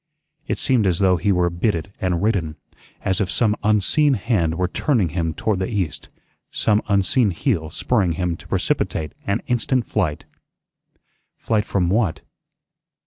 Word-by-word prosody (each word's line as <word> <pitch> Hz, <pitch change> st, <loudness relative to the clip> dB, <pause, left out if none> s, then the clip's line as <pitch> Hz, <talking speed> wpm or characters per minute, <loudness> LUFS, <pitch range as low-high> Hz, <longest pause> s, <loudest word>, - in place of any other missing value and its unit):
It -, -, -1 dB
seemed 120 Hz, -7 st, +2 dB
as 90 Hz, -3 st, +1 dB
though 95 Hz, -2 st, +3 dB
he 95 Hz, +5 st, +1 dB
were 90 Hz, -2 st, +2 dB
bitted 90 Hz, +1 st, -1 dB
and 90 Hz, -1 st, 0 dB
ridden; 90 Hz, -8 st, 0 dB, 0.5 s
as 95 Hz, 0 st, +1 dB
if 95 Hz, -, 0 dB
some 105 Hz, +1 st, +2 dB
unseen 110 Hz, +8 st, +3 dB
hand 90 Hz, -11 st, 0 dB
were 90 Hz, +1 st, 0 dB
turning 105 Hz, -, +1 dB
him 80 Hz, 0 st, -2 dB
toward 105 Hz, -4 st, -1 dB
the 95 Hz, -, -1 dB
east; 95 Hz, -10 st, -3 dB, 0.4 s
some 105 Hz, -1 st, +1 dB
unseen 100 Hz, +4 st, +2 dB
heel 85 Hz, -, -1 dB
spurring 95 Hz, 0 st, 0 dB
him 90 Hz, 0 st, -1 dB
to -, -, -15 dB
precipitate 75 Hz, -2 st, -1 dB
and 100 Hz, +3 st, 0 dB
instant 125 Hz, 0 st, 0 dB
flight. 90 Hz, -9 st, -2 dB, 1.1 s
Flight 110 Hz, -2 st, 0 dB
from 90 Hz, -3 st, 0 dB
what? 100 Hz, -4 st, +1 dB
95 Hz, 150 wpm, -21 LUFS, 85-110 Hz, 1.1 s, though